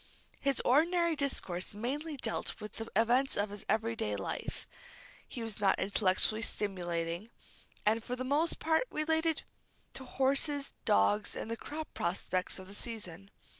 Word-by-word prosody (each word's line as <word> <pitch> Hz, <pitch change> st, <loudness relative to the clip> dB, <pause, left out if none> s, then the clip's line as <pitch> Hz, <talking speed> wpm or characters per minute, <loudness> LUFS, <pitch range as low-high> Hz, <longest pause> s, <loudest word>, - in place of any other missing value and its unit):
His 275 Hz, -1 st, +2 dB
ordinary 335 Hz, +5 st, +4 dB
discourse 205 Hz, -10 st, -1 dB
mainly 285 Hz, +8 st, -3 dB
dealt 230 Hz, -3 st, -2 dB
with 210 Hz, -, -8 dB
the 225 Hz, -, -4 dB
events 245 Hz, +5 st, +3 dB
of 205 Hz, 0 st, +1 dB
his 205 Hz, -1 st, -6 dB
everyday 220 Hz, -, +1 dB
life. 95 Hz, -, -4 dB, 0.6 s
It 240 Hz, -, -5 dB
was 225 Hz, -2 st, -4 dB
not 195 Hz, -2 st, +4 dB
intellectually 200 Hz, +2 st, +3 dB
stimulating, 175 Hz, -2 st, -1 dB, 0.6 s
and 220 Hz, +2 st, +3 dB
for 250 Hz, -, -3 dB
the 255 Hz, -, -3 dB
most 290 Hz, +6 st, +2 dB
part 320 Hz, +9 st, +2 dB
related 320 Hz, +1 st, +1 dB, 0.5 s
to 265 Hz, -, -6 dB
horses, 275 Hz, +2 st, +1 dB
dogs, 200 Hz, -, +3 dB
and 230 Hz, -, -4 dB
the -, -, 0 dB
crop 305 Hz, +6 st, -6 dB
prospects 185 Hz, +1 st, -1 dB
of 190 Hz, -, -8 dB
the 200 Hz, -, -10 dB
season. 200 Hz, -4 st, -5 dB
225 Hz, 145 wpm, -33 LUFS, 195-280 Hz, 0.6 s, ordinary